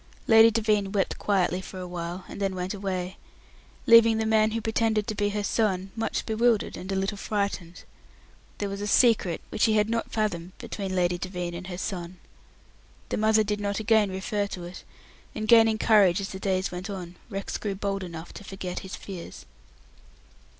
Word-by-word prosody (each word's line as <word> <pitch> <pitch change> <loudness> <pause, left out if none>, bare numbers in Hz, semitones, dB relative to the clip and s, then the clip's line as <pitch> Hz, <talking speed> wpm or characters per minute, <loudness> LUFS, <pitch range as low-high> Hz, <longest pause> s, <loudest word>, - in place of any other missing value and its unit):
Lady 225 0 +8
Devine 210 -3 +1
wept 195 -2 -1
quietly 185 -2 +1
for 190 - -9
a 180 - -5
while, 175 +1 -5
and - - -8
then 195 -1 0
went 180 +1 -3
away, 190 -2 -4 0.7
leaving 230 -1 +7
the 220 - 0
man 220 0 +3
who 225 +1 -2
pretended 220 -1 +1
to 220 - -3
be 205 0 0
her 205 0 -2
son 195 -3 0
much 225 - -2
bewildered 225 0 +1
and 185 +2 -6
a - - 0
little 195 +1 -2
frightened. 200 -5 -3 0.7
There 205 - -2
was 200 0 -5
a 205 - -2
secret 210 -6 +3
which - - +2
he 220 - +3
had 215 +1 +2
not 230 0 -2
fathomed 185 -5 -2
between 195 -2 -5
Lady 175 -1 +1
Devine 180 -2 -4
and 180 +2 -7
her 180 -2 -6
son. 180 -2 -5 0.9
The - - -1
mother 215 0 +4
did 210 0 -2
not 200 0 -1
again 220 -1 +3
refer 200 +2 -2
to 185 -3 -7
it, 175 +1 -9 0.5
and, 215 0 -3
gaining 225 -1 +6
courage 205 -5 +4
as 195 - -4
the 190 - -7
days 190 -1 0
went 180 +3 -6
on, 180 -3 -6
Rex 195 -2 -4
grew 200 -2 -3
bold 195 0 -2
enough 170 -2 -8
to - - -10
forget 190 -2 -5
his 190 - -7
fears. 170 - -9
200 Hz, 190 wpm, -26 LUFS, 185-215 Hz, 0.9 s, Lady